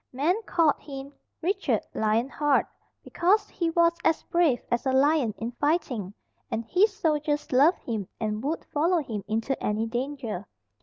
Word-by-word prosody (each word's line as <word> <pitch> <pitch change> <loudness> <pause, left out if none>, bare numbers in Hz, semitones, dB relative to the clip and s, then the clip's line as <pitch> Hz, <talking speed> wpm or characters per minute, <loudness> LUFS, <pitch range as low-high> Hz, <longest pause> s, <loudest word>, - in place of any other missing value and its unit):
Men 320 - +1
called 320 -4 +3
him 275 -1 -8 0.3
Richard 390 +3 0
Lion 220 +3 +1
heart, 290 0 +2 0.4
because 410 +5 +2
he 340 -2 -1
was 335 0 +4
as 320 - +2
brave 330 -8 +2
as 240 +2 0
a - - +3
lion 275 -2 +3
in 230 +2 -4
fighting, 245 - -1 0.3
and 225 +1 -3
his 385 - +3
soldiers 300 -5 0
loved 285 +7 +4
him 215 -6 -3
and 215 0 -2
would 310 +4 -2
follow 335 +5 +2
him 215 -6 -5
into 225 +5 -1
any 215 +2 0
danger. 240 -4 -4
280 Hz, 155 wpm, -27 LUFS, 230-330 Hz, 0.4 s, was